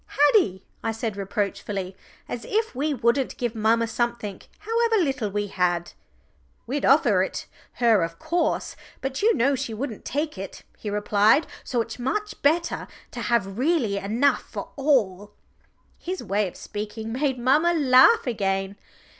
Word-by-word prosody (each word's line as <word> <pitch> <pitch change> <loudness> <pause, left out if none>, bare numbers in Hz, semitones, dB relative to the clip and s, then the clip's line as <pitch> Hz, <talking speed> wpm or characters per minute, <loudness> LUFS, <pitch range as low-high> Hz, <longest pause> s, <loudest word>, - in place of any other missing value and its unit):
"Haddie," 190 - +2 0.2
I 225 -1 -1
said 225 -2 -3
reproachfully, 200 -1 -3 0.3
"as 240 - -5
if 440 +2 -1
we 290 +4 -1
wouldn't 245 0 +1
give 240 -2 -2
mamma 225 +1 +2
something 235 -4 -3 0.2
however 455 +1 +1
little 270 - 0
we 205 +1 -1
had!" 175 -3 -1 0.7
"We'd 275 +4 -2
offer 240 -9 +5
it 190 - -3 0.3
her 230 -5 +3
of 165 0 -3
course, 340 +2 -1 0.2
but 270 0 -3
you 440 +1 +4
know 270 +4 +3
she 255 -4 -3
wouldn't 235 -2 -5
take 295 -5 -3
it," 195 - -8
he 210 - -6
replied. 210 +6 +3 0.2
"So 245 -3 0
it's 230 +1 -6
much 420 +12 -3
better 330 +4 +1 0.2
to - - -6
have 205 -3 0
really 260 -9 +1
enough 230 +8 +1
for - - -7
all." 210 -9 +1 0.7
His 370 -3 -5
way 200 -1 0
of 180 - -10
speaking 215 +2 -6
made 265 0 0
mamma 285 +8 +3
laugh 290 - +5
again. 195 -4 -1
235 Hz, 150 wpm, -25 LUFS, 205-285 Hz, 0.7 s, offer